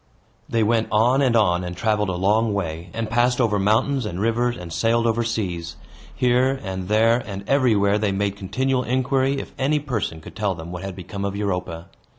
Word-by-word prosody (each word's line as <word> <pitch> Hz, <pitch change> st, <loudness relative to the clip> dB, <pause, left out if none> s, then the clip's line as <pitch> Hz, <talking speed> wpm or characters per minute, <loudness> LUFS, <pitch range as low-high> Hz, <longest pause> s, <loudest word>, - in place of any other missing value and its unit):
They 115 Hz, -1 st, +2 dB
went 110 Hz, +1 st, +2 dB
on 120 Hz, +6 st, +3 dB
and 125 Hz, -4 st, +3 dB
on, 90 Hz, -5 st, +3 dB
and 90 Hz, 0 st, -6 dB
traveled 105 Hz, -1 st, +1 dB
a -, -, -1 dB
long 105 Hz, +4 st, +1 dB
way, 85 Hz, -2 st, -4 dB
and 115 Hz, +2 st, -3 dB
passed 120 Hz, +3 st, +2 dB
over 110 Hz, -4 st, +2 dB
mountains 115 Hz, +7 st, +2 dB
and 90 Hz, -4 st, -4 dB
rivers, 120 Hz, +3 st, 0 dB
and 85 Hz, -2 st, -8 dB
sailed 115 Hz, +7 st, +1 dB
over 115 Hz, 0 st, +1 dB
seas. 90 Hz, -7 st, -3 dB, 0.4 s
Here, 130 Hz, +2 st, +2 dB
and 95 Hz, -2 st, -4 dB
there, 115 Hz, +3 st, +3 dB
and 100 Hz, 0 st, -7 dB
everywhere, 105 Hz, -7 st, +3 dB
they 105 Hz, -2 st, 0 dB
made 100 Hz, 0 st, -1 dB
continual 125 Hz, +7 st, -1 dB
inquiry 130 Hz, +2 st, +1 dB
if -, -, -8 dB
any 140 Hz, +3 st, +2 dB
person 115 Hz, -, -3 dB
could 80 Hz, -, -12 dB
tell 105 Hz, -3 st, -1 dB
them 80 Hz, +1 st, -8 dB
what 90 Hz, 0 st, -6 dB
had 95 Hz, -1 st, -6 dB
become 95 Hz, +2 st, -6 dB
of 100 Hz, 0 st, -2 dB
Europa. 90 Hz, -4 st, -3 dB
105 Hz, 195 wpm, -22 LUFS, 95-120 Hz, 0.4 s, on